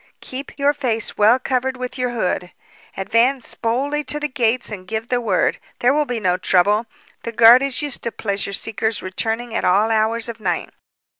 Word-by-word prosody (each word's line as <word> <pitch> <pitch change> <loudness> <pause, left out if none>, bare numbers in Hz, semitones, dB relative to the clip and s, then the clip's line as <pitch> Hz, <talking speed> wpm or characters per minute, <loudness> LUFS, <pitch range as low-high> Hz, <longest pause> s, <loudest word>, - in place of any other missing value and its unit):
Keep 265 +2 -8
your 285 0 +2
face 235 -6 -2
well 215 +4 +5
covered 260 0 -1
with 250 0 -5
your 250 -1 -1
hood. 185 -6 -2 0.5
Advance 230 +6 +1
boldly 275 +6 -1
to 295 +3 -3
the 300 - -1
gates 250 -4 0
and 185 -3 -8
give 220 +2 -4
the 245 -1 +1
word. 205 -6 +1 0.2
There 245 +2 +3
will 300 0 +1
be 245 -2 -2
no 180 -3 +1
trouble. 205 +5 +2 0.3
The 230 - -5
guard 235 +2 +7
is 275 +1 -1
used 290 -3 -4
to 235 - -2
pleasure 200 -2 -3
seekers 220 +1 +1
returning 225 +5 -3
at - - -1
all 205 +5 +3
hours 225 +1 +1
of 230 -1 -6
night." 180 -5 -2
230 Hz, 190 wpm, -20 LUFS, 215-255 Hz, 0.5 s, guard